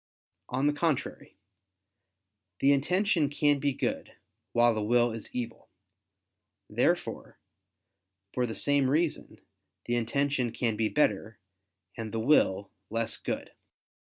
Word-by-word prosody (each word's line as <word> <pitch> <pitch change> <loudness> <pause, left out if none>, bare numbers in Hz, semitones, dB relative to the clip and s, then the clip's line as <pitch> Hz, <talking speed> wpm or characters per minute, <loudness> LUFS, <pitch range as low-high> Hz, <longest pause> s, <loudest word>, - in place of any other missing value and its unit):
On 130 +2 0
the 145 - +3
contrary, 145 - -2 1.2
The 140 +1 +5
intention 175 +2 +2
can 145 0 +2
be 140 0 +1
good, 130 - -3 0.4
while 120 0 +4
the 110 - -2
will 120 +2 +3
is 110 -1 -6
evil. 120 -2 -5 1.0
Therefore, - - -1 1.0
for 125 -1 0
the 110 - -5
same 145 -2 +2
reason, 155 +3 -1 0.4
the 120 - 0
intention 130 +1 0
can 115 -3 0
be 110 0 0
better, 110 -7 +1 0.6
and 110 -2 -5
the 115 - -2
will 105 -6 +3 0.2
less 115 0 -2
good. - - -4
125 Hz, 120 wpm, -29 LUFS, 115-145 Hz, 1.2 s, The